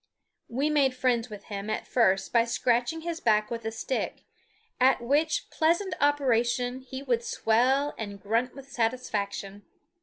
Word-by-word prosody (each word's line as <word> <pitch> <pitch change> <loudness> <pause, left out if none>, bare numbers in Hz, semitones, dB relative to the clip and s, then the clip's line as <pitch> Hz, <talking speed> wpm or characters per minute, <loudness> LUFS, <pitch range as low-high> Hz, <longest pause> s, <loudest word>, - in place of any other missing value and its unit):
We 275 +6 0
made 275 -4 +3
friends 250 -2 +1
with 210 -2 -9
him 200 0 -6
at 215 - -2
first 195 -6 +2
by 235 -1 +5
scratching 245 +6 0
his 335 0 -4
back 215 -1 +2
with 230 -1 -4
a 225 - -1
stick, 225 +3 -3 0.6
at 260 +1 +5
which 295 +6 +1
pleasant 340 +5 +1
operation 250 -3 +2
he 260 +1 -8
would 240 -3 0
swell 260 +7 +2
and 205 -2 -6
grunt 230 +6 -1
with 275 0 -12
satisfaction. 210 -5 -2
245 Hz, 150 wpm, -28 LUFS, 225-275 Hz, 0.6 s, by